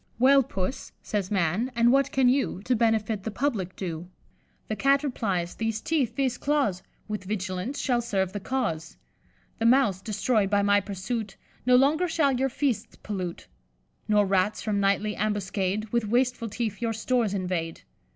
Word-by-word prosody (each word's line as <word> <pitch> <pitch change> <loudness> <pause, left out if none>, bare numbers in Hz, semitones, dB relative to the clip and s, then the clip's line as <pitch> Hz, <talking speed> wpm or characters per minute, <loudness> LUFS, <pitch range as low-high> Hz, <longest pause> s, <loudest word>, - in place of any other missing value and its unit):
"'Well, 270 +3 +6
Puss,' 195 0 -4
says 200 -3 -2
Man, 195 +6 0
'and 235 +1 +4
what 275 0 +3
can 265 -1 +3
you 250 -7 +1
To 250 - +1
benefit 220 -2 +1
the 220 - -4
public 215 -7 -2
do?' 175 -2 -5 0.6
The 215 - -2
Cat 275 +4 +3
replies, 195 -11 -1
'These 225 -1 -2
teeth, 270 -8 0
these 265 -2 0
claws, 280 -11 +1 0.3
With 210 -3 -4
vigilance 190 +5 -3
shall 245 -3 +1
serve 190 -5 -1
the 205 - -3
cause. 190 -9 -3 0.6
The 225 - +3
Mouse, 230 -7 +4
destroy'd 210 0 +1
by 200 0 +2
my 205 0 +4
pursuit, 200 +2 -4 0.3
No 250 - +6
longer 295 +7 +4
shall 315 -4 +2
your 265 +1 +1
feasts 265 -1 -2
pollute; 185 -4 -5 0.6
Nor 210 -1 +4
Rats, 195 +1 +1
from 210 -2 0
nightly 200 +2 +1
ambuscade, 205 0 -1
With 235 -3 0
wasteful 245 -1 +1
teeth 220 0 -3
your 230 -1 0
stores 225 -2 0
invade. 180 -3 -3
215 Hz, 160 wpm, -26 LUFS, 195-250 Hz, 0.6 s, Well